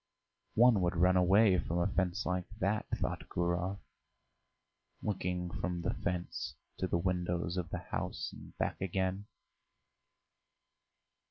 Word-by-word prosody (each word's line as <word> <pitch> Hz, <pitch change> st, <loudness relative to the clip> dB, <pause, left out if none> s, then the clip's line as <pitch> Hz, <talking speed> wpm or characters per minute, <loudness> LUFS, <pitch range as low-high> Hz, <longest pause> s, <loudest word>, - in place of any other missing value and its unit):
"One 120 Hz, -3 st, +6 dB
would 90 Hz, +1 st, +1 dB
run 90 Hz, +2 st, +4 dB
away 95 Hz, +1 st, +5 dB
from 85 Hz, +1 st, -2 dB
a 85 Hz, -, +2 dB
fence 95 Hz, -1 st, 0 dB
like 90 Hz, -1 st, -1 dB
that," 105 Hz, +1 st, 0 dB
thought -, -, -3 dB
Gurov, 90 Hz, +2 st, 0 dB, 1.3 s
looking 90 Hz, -3 st, -1 dB
from 85 Hz, +2 st, -2 dB
the -, -, 0 dB
fence 90 Hz, 0 st, -3 dB, 0.2 s
to 95 Hz, -, 0 dB
the 85 Hz, -, +1 dB
windows 90 Hz, -1 st, 0 dB
of 90 Hz, -3 st, -2 dB
the -, -, -2 dB, 0.2 s
house -, -, -2 dB
and -, -, -12 dB
back -, -, -1 dB
again. 95 Hz, +2 st, -1 dB
90 Hz, 125 wpm, -33 LUFS, 90-95 Hz, 1.3 s, One